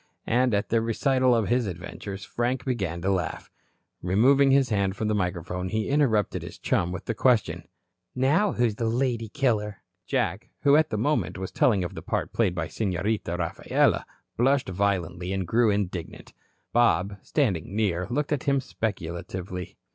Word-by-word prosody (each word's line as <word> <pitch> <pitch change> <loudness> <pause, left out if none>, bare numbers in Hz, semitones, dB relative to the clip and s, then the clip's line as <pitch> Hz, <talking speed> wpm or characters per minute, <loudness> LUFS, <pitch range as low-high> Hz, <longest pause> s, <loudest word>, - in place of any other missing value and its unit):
And 125 -1 +2
at 100 - -1
the 115 0 +2
recital 130 +2 +2
of 115 -3 +1
his 120 -2 +1
adventures, 95 +2 -7
Frank 125 +2 -2
began 95 -10 -2
to 100 - +2
laugh. 90 -4 -3 0.5
Removing 130 +10 +4
his 135 -2 +4
hand 100 -3 0
from 110 0 -2
the - - +1
microphone, 90 -1 -2
he 110 +2 -1
interrupted 130 -8 +2
his - - -9
chum 90 0 0
with 90 - -6
the 115 - -1
question: 120 -1 +1 0.5
"Now, 155 +10 +2
who's 115 -4 +1
the 115 - -1
lady 120 -2 -1
killer?" 110 -6 -1 0.2
Jack, - - -1
who 140 0 +5
at 155 0 +4
the 110 - -2
moment, 145 +3 0
was 95 0 -5
telling 105 -7 +3
of 90 - -4
the - - -7
part - - -3
played 100 -6 +1
by 80 -2 -2
Senorita 95 -2 -2
Rafaela, 85 -2 +1 0.3
blushed 135 -1 +2
violently 90 -2 -1
and 95 -1 -1
grew 115 +5 +3
indignant. 95 -5 -3 0.4
Bob, 100 -4 +3
standing 100 - -1
near, 95 -4 0
looked 145 +4 -1
at 145 -4 -1
him 140 -1 +3
speculatively. 90 -5 -5
105 Hz, 165 wpm, -26 LUFS, 95-125 Hz, 0.5 s, who